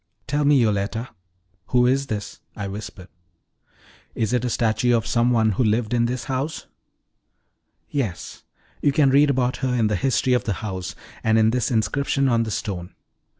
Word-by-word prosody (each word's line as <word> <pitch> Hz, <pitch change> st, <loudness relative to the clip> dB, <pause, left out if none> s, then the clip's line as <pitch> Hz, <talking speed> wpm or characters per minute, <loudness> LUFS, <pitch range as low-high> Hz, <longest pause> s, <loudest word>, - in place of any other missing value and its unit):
"Tell 145 Hz, +2 st, 0 dB
me, 145 Hz, -1 st, +5 dB
Yoletta, 110 Hz, +1 st, 0 dB, 0.6 s
who 125 Hz, -1 st, +3 dB
is 135 Hz, +2 st, +1 dB
this?" 105 Hz, -2 st, -5 dB, 0.2 s
I 100 Hz, -1 st, -4 dB
whispered. 100 Hz, -2 st, -8 dB, 1.1 s
"Is 110 Hz, +1 st, -1 dB
it 125 Hz, -1 st, +1 dB
a 125 Hz, -, 0 dB
statue 120 Hz, +1 st, +2 dB
of 115 Hz, -, -3 dB
some 120 Hz, +1 st, +2 dB
one 110 Hz, -3 st, +3 dB
who 105 Hz, -, 0 dB
lived 110 Hz, +1 st, +1 dB
in 120 Hz, -1 st, +2 dB
this 125 Hz, 0 st, -2 dB
house?" 135 Hz, +4 st, -3 dB, 1.2 s
"Yes; 115 Hz, -11 st, -4 dB, 0.4 s
you 145 Hz, -, +3 dB
can 140 Hz, -2 st, +3 dB
read 145 Hz, +2 st, +5 dB
about 125 Hz, -1 st, +1 dB
her 130 Hz, -1 st, -1 dB
in 110 Hz, -3 st, +2 dB
the 105 Hz, -, +1 dB
history 130 Hz, +4 st, +1 dB
of 125 Hz, -, +1 dB
the 105 Hz, -, 0 dB
house, 95 Hz, -1 st, -5 dB, 0.3 s
and 110 Hz, 0 st, +3 dB
in 110 Hz, 0 st, +4 dB
this 125 Hz, 0 st, 0 dB
inscription 135 Hz, +4 st, +1 dB
on 115 Hz, -2 st, +2 dB
the 115 Hz, -, -2 dB
stone. 95 Hz, -4 st, -4 dB
120 Hz, 175 wpm, -23 LUFS, 110-130 Hz, 1.2 s, me